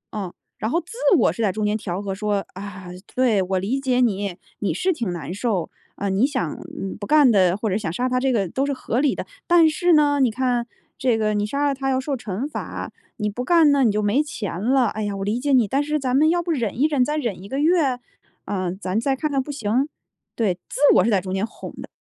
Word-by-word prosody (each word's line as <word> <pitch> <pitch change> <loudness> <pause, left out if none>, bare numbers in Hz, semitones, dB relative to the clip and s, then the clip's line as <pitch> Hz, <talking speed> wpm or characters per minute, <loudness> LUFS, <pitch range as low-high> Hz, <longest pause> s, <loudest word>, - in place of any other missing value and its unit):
嗯， 195 -4 -4 0.2
然 220 +3 -2
后 340 - +2
自 355 - -11 0.2
我 235 - +3
是 230 - -5
在 205 -3 +2
中 215 +2 -2
间 210 0 +1
调 190 -3 -4
和 195 -1 -4
说： 205 0 -1
“啊， 190 -2 -8 0.3
对， 245 -6 +3
我 190 0 0
理 235 +9 -1
解 255 -2 +1
你， 200 -6 0 0.2
你 205 - 0
是 370 0 +1
挺 235 - -3
难 170 -1 -5
受， 200 -6 -1 0.3
呃， 200 - -2
你 195 +6 +3
想 260 - -2 0.3
嗯， 195 - -4
不 205 - -6
干 295 -1 +5
的， 185 -4 +4
或 220 0 -2
者 190 - +1
想 205 -6 -3
杀 245 +9 -1
他 255 0 0
这 265 +1 +1
个 205 -6 +1
都 265 +11 -1
是 285 - -1
合 255 -2 -1
理 290 - +2
的， - - -5 0.2
但 340 -3 +6
是 350 +3 +1
呢， 290 -2 +4
你 250 -3 +3
看， 245 0 0 0.3
这 245 -4 +1
个， 215 -1 +1
你 205 0 0
杀 280 +6 0
了 280 - +1
他 270 0 -2
要 260 - +1
受 275 +1 -2
惩 225 +1 -4
罚， 300 - -6 0.3
你 210 -2 -1
不 245 +5 -4
干 330 0 +5
那 280 -2 +3
你 225 - +4
就 210 +1 0
没 210 +8 +2
钱 205 - -5
了， 260 +2 +3
哎 215 +1 -3
呀， 205 -1 -2
我 195 - -3
理 215 +4 0
解 285 +2 -1
你， 245 -5 +4
但 275 +8 +1
是 300 +1 -1
咱 260 -2 -1
们 310 +3 +5
要 345 +1 +2
不 345 0 -3
忍 235 -6 -2
一 290 - +4
忍？ 285 -5 +2
再 300 +4 -1
忍 225 -10 -3
1 200 - -10
个 270 - -2
月？ 300 -5 +2 0.5
嗯， 185 -2 -2
咱 185 +1 -2
再 270 +4 +1
看 305 +3 -2
看 270 -2 0
不 295 - -6
行” 260 +1 0 0.5
对， 215 -5 +1 0.2
自 - - -6 0.2
我 - - +6
是 225 - +1
在 200 - +4
中 185 0 -5
间 195 +2 0
哄 - - -10
的。 - - -8
235 Hz, 275 characters per minute, -22 LUFS, 200-275 Hz, 0.5 s, 但